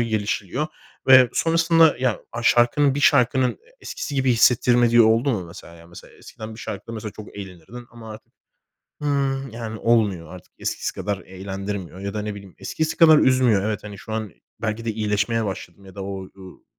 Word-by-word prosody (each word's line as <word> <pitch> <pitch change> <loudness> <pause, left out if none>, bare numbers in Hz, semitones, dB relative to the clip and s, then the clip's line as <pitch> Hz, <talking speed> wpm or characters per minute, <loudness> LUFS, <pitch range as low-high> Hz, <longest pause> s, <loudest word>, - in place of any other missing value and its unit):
gelişiliyor 110 - -2 0.4
ve 130 -2 +8
sonrasında, 165 -1 +3
yani, 130 -4 0
a 120 0 -5
şarkının 130 +5 +3
bir 145 - -2
şarkının, 130 -2 +3
e - - -17 0.2
eskisi 145 - -6
gibi 135 -2 +2
hissettirmediği 120 0 +4
oldu 115 +5 +3
mu 95 -7 -2
mesela 85 0 -12
yani? 85 0 -16
Mesela, 85 - -14
ya, - - -21
eskiden 110 0 -10
bir - - -13
şarkıda 115 - -7
mesela 110 -2 -6
çok 105 -1 -12
eğlenirdin 100 +5 -10
ama 115 -2 -11
artık, 110 - -14 0.7
hıı, 135 -2 -1
yani, 110 -1 -6
olmuyor. 100 -8 +1
Artık 90 - -15
eskisi - - -3
kadar 105 -1 -3
eğlendirmiyor 95 0 -7
ya 100 0 -5
da, 105 - -3
ne 105 -1 -5
bileyim, 100 -3 -12
eskisi 160 +1 -3
kadar 160 -2 +7
üzmüyor. 125 -6 +3
Evet, 105 -2 -3
hani, 105 -1 -9
şu 110 - -8
an 110 -4 -4 0.3
belki 115 +1 -3
de 115 - 0
iyileşmeye 105 +1 0
başladın 95 -1 -7
ya 95 +1 -14
da 100 - -6
o 100 - -5 0.2
u 95 -1 -14
110 Hz, 185 wpm, -22 LUFS, 100-125 Hz, 0.7 s, ve